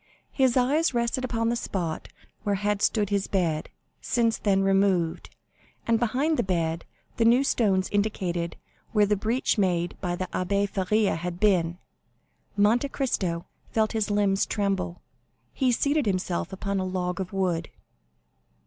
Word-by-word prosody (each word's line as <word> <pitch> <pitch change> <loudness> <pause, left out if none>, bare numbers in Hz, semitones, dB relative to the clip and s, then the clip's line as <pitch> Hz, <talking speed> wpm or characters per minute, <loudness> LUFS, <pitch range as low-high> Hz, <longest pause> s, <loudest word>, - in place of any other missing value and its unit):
His 260 -2 +2
eyes 275 +3 +2
rested 235 +2 0
upon 230 -2 0
the 235 - +1
spot 175 -8 -3 0.3
where 205 -2 0
had 205 +1 -1
stood 210 -3 +1
his 200 -1 0
bed, 165 -5 0 0.3
since 230 -2 +1
then 195 -2 +2
removed, 195 -4 +1 0.6
and 230 -1 +2
behind 270 +7 +1
the - - +3
bed 165 -3 -1 0.3
the 230 - +3
new 240 +4 +5
stones 195 -8 +2
indicated 185 -5 -1 0.4
where 210 -2 +5
the 210 +1 +2
breach 225 +3 0
made 175 -3 +1
by 175 -2 -1
the 185 - -3
Abbé 200 +2 0
Faria 200 +2 +1
had 175 +1 -5
been. 180 -5 +2 0.8
Monte 230 +7 +3
Cristo 185 -12 -1 0.3
felt 220 -1 +2
his 220 -1 -1
limbs 205 -1 +2
tremble; 195 -4 -2 0.5
he 260 -2 +2
seated 285 +3 +1
himself 185 -2 -1
upon 200 +1 -2
a - - -1
log 180 -1 -2
of 185 - -5
wood. 180 -4 -1
200 Hz, 150 wpm, -26 LUFS, 180-230 Hz, 0.8 s, new